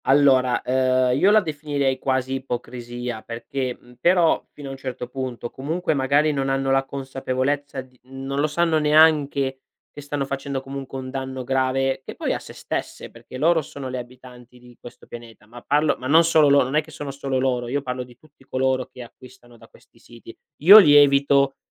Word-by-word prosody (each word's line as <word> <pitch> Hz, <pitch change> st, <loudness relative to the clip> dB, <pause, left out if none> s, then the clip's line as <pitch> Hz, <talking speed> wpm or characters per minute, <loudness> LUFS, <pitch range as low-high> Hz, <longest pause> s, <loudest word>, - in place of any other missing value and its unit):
Allora, 130 Hz, -2 st, +3 dB
ehm, 130 Hz, 0 st, +1 dB
io 195 Hz, -, +4 dB
la 215 Hz, +1 st, +5 dB
definirei 145 Hz, -5 st, -2 dB
quasi 130 Hz, -1 st, -1 dB
ipocrisia 120 Hz, -2 st, -6 dB
perché 125 Hz, +2 st, -5 dB
mhmm, 125 Hz, -, -19 dB
però 175 Hz, 0 st, +3 dB
fino 145 Hz, -2 st, -10 dB
a -, -, -6 dB
un 135 Hz, -, -8 dB
certo 130 Hz, -2 st, -6 dB
punto. 130 Hz, -3 st, -6 dB
Comunque 160 Hz, +7 st, -2 dB
magari 145 Hz, +2 st, +2 dB
non 135 Hz, -2 st, -2 dB
hanno 135 Hz, 0 st, 0 dB
la 135 Hz, 0 st, +2 dB
consapevolezza 135 Hz, +1 st, -3 dB
di 130 Hz, -1 st, -20 dB
non 135 Hz, +1 st, -5 dB
lo 150 Hz, -, +2 dB
sanno 160 Hz, +1 st, +1 dB
neanche, 150 Hz, -3 st, +3 dB, 0.3 s
che 145 Hz, -, -10 dB
stanno 145 Hz, -1 st, -3 dB
facendo 135 Hz, 0 st, -4 dB
comunque 135 Hz, 0 st, -7 dB
un 130 Hz, 0 st, -7 dB
danno 130 Hz, -1 st, -5 dB
grave, 135 Hz, +1 st, 0 dB
che -, -, -9 dB
poi -, -, -2 dB
a -, -, -3 dB
sè -, -, -12 dB
stesse, -, -, -6 dB
perché 130 Hz, -, -12 dB
loro 165 Hz, +4 st, +3 dB
sono 140 Hz, -2 st, -8 dB
le 130 Hz, 0 st, -4 dB
abitanti 125 Hz, 0 st, -13 dB
di 125 Hz, 0 st, -17 dB
questo 120 Hz, -, -13 dB
pianeta. 115 Hz, -3 st, -12 dB
Ma 120 Hz, +3 st, -13 dB
parlo 150 Hz, +4 st, +1 dB
ma 130 Hz, -, -5 dB
non 160 Hz, +4 st, +6 dB
solo 160 Hz, -3 st, +4 dB
lo 140 Hz, 0 st, +5 dB
non 130 Hz, +3 st, -4 dB
è 155 Hz, -, +4 dB
che 155 Hz, -, -17 dB
sono 145 Hz, -2 st, -7 dB
solo 135 Hz, -1 st, -3 dB
loro, 125 Hz, -2 st, -1 dB
io 140 Hz, +3 st, -2 dB
parlo 125 Hz, -1 st, -4 dB
di 125 Hz, -1 st, -17 dB
tutti 150 Hz, -1 st, -24 dB
coloro 130 Hz, -1 st, -1 dB
che 125 Hz, -, -11 dB
acquistano 120 Hz, 0 st, -17 dB
da 115 Hz, -, -17 dB
questi -, -, -24 dB
siti. 115 Hz, -1 st, -14 dB, 0.3 s
Io 200 Hz, +6 st, +11 dB
li 150 Hz, -8 st, +6 dB
evito, 140 Hz, -1 st, +4 dB
135 Hz, 195 wpm, -22 LUFS, 130-145 Hz, 0.3 s, Io